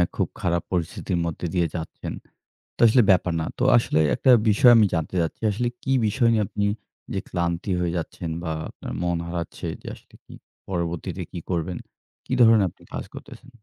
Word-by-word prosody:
খুব -, -, 0 dB
খারাপ 85 Hz, -2 st, 0 dB
পরিস্থিতির 90 Hz, +1 st, -2 dB
মধ্যে 85 Hz, +1 st, -4 dB
দিয়ে 85 Hz, -2 st, +2 dB
যাচ্ছেন। 80 Hz, -2 st, -5 dB, 0.6 s
তো -, -, -43 dB
আসলে 125 Hz, +3 st, +5 dB
ব্যাপার 90 Hz, -2 st, +2 dB
না। 80 Hz, -, -2 dB
তো -, -, +1 dB
আসলে 75 Hz, -, +1 dB, 0.2 s
একটা 130 Hz, -, +4 dB, 0.2 s
বিষয় 120 Hz, +4 st, +6 dB
আমি 110 Hz, -, +6 dB
জানতে 80 Hz, +1 st, -2 dB
চাচ্ছি। 80 Hz, -, -3 dB
আসলে 120 Hz, +4 st, -1 dB, 0.2 s
কি 135 Hz, -, -2 dB, 0.2 s
বিষয় 115 Hz, +3 st, +2 dB
নিয়ে 110 Hz, -2 st, +2 dB
আপনি 100 Hz, +2 st, -2 dB, 0.5 s
যে, 95 Hz, -, 0 dB
ক্লান্তি 85 Hz, +2 st, -2 dB
হয়ে 85 Hz, -1 st, 0 dB
যাচ্ছেন 85 Hz, 0 st, -5 dB
বা 80 Hz, -, -2 dB, 0.2 s
আপনার -, -, -8 dB
মন 85 Hz, -1 st, 0 dB
হারাচ্ছে 85 Hz, -1 st, -5 dB, 0.2 s
যে, -, -, -12 dB
আসলে -, -, -21 dB
কি -, -, -13 dB, 0.4 s
পরবর্তীতে 85 Hz, -2 st, -3 dB
কি 90 Hz, -, -5 dB
করবেন? 85 Hz, 0 st, -2 dB, 0.5 s
কি -, -, -4 dB
ধরনের 110 Hz, -4 st, +6 dB
আপনি -, -, -22 dB
কাজ -, -, -3 dB
করতেছেন? 130 Hz, -, -11 dB
90 Hz, 180 wpm, -24 LUFS, 85-105 Hz, 0.6 s, বিষয়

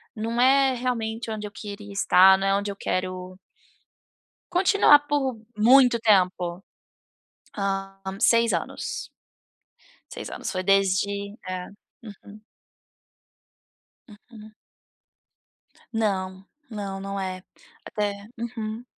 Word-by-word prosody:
não 230 Hz, +2 st, -3 dB
é 270 Hz, +1 st, +5 dB
realmente 230 Hz, -2 st, -3 dB
onde 210 Hz, -1 st, -4 dB
eu -, -, -12 dB
queria 205 Hz, -1 st, -9 dB
estar, 190 Hz, -1 st, +6 dB
não 195 Hz, 0 st, -1 dB
é 195 Hz, -, +3 dB
onde 200 Hz, +1 st, -2 dB
eu -, -, -8 dB
quero 185 Hz, 0 st, -4 dB, 1.1 s
continuar 355 Hz, -5 st, +5 dB
por 270 Hz, -5 st, 0 dB, 0.2 s
muito 245 Hz, +2 st, +6 dB
tempo, 185 Hz, -4 st, +1 dB, 0.9 s
hã, 195 Hz, -1 st, -3 dB, 0.2 s
6 230 Hz, +1 st, +4 dB
anos -, -, -4 dB, 1.0 s
6 -, -, -7 dB
anos -, -, -5 dB
foi 185 Hz, -2 st, -3 dB
desde 195 Hz, +1 st, +1 dB
eh. 185 Hz, -1 st, -5 dB, 0.3 s
Uhum. 210 Hz, 0 st, -13 dB, 1.6 s
Uhum. 215 Hz, 0 st, -15 dB, 1.4 s
Não, 190 Hz, -4 st, -2 dB, 0.2 s
não, 200 Hz, -3 st, -5 dB
não 195 Hz, 0 st, -5 dB
é, 185 Hz, -1 st, -5 dB, 0.4 s
até. 205 Hz, -1 st, -4 dB
Uhum. 225 Hz, -1 st, -5 dB
205 Hz, 100 wpm, -25 LUFS, 195-230 Hz, 1.6 s, estar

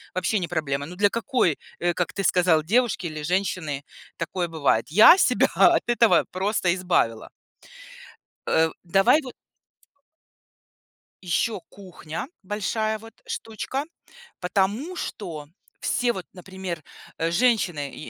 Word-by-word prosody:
вообще 185 Hz, +3 st, 0 dB
не 175 Hz, -, -3 dB
проблема. 145 Hz, -4 st, -2 dB
Ну 175 Hz, -, -9 dB
для 205 Hz, +2 st, +3 dB
какой, 230 Hz, -, 0 dB, 0.2 s
э, 175 Hz, 0 st, +1 dB
как 180 Hz, -, -2 dB
ты 195 Hz, -, -3 dB
сказал, 175 Hz, -4 st, +3 dB
девушки 220 Hz, 0 st, +1 dB
или 155 Hz, -1 st, -6 dB
женщины 175 Hz, -5 st, -1 dB, 0.4 s
такое 180 Hz, -2 st, -2 dB
бывает? 145 Hz, -8 st, +1 dB
Я 215 Hz, -, +8 dB
себя -, -, +3 dB
от -, -, +5 dB
этого 230 Hz, -, +5 dB
просто 190 Hz, 0 st, 0 dB
избавила. 175 Hz, -12 st, 0 dB, 1.2 s
Э, 160 Hz, 0 st, +3 dB
давай 195 Hz, -, +4 dB
вот 255 Hz, -, -8 dB, 1.9 s
Еще 195 Hz, +5 st, 0 dB
кухня, 180 Hz, -1 st, -8 dB, 0.2 s
большая 215 Hz, +2 st, -2 dB
вот 225 Hz, +1 st, -13 dB
штучка. 225 Hz, +5 st, -4 dB, 0.6 s
Потому 205 Hz, -, -1 dB
что 165 Hz, -, -6 dB, 0.3 s
все, 245 Hz, -1 st, +1 dB
вот, 185 Hz, -4 st, -7 dB
например, 185 Hz, -3 st, -7 dB, 0.3 s
э, 165 Hz, +1 st, 0 dB
женщины 175 Hz, -, +1 dB
и -, -, -9 dB
185 Hz, 125 wpm, -24 LUFS, 165-215 Hz, 1.9 s, Я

